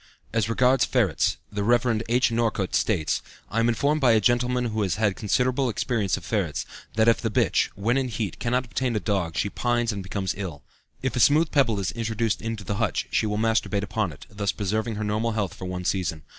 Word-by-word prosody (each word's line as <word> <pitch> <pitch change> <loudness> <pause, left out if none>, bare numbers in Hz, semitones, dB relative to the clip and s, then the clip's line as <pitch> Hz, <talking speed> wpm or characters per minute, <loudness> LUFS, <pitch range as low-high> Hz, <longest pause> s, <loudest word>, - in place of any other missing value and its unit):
As 110 -2 +1
regards 125 +3 +3
ferrets, 115 -10 +1
the 100 -1 -2
Rev. 120 0 +2
H. 120 0 +3
Northcote 115 -5 0
states: 80 - +1 0.3
"I 115 - 0
am 115 +1 +3
informed 145 +6 +1
by 125 -4 +5
a 110 - +5
gentleman 125 +2 +1
who 110 -2 -1
has 95 -4 0
had 105 -2 +1
considerable 125 +4 +1
experience 110 -4 0
of 90 - -9
ferrets, 80 - -1 0.3
that 110 +1 +3
if 115 - +4
the 115 - 0
bitch, 105 - +2
when 115 +6 +1
in 135 -1 0
heat, 105 -5 -4
cannot 125 +2 0
obtain 125 0 -2
a - - +2
dog 95 -7 -1
she - - +1
pines 120 +2 0
and 100 -2 -4
becomes 95 0 -3
ill. 90 -7 -6 0.4
If 130 - -1
a - - 0
smooth 155 +6 +4
pebble 120 -8 +2
is 95 - -1
introduced 115 -1 -1
into 115 -2 -4
the 100 +1 -3
hutch, 110 -2 -1
she 110 - +1
will 105 0 -1
masturbate 110 -2 +1
upon 100 -3 -1
it, 70 - -12
thus 100 -1 -2
preserving 110 +4 -2
her 105 - -3
normal 110 +2 0
health 105 -4 -1
for 95 - -8
one 90 0 -4
season. 85 -5 -1
110 Hz, 215 wpm, -25 LUFS, 100-120 Hz, 0.4 s, by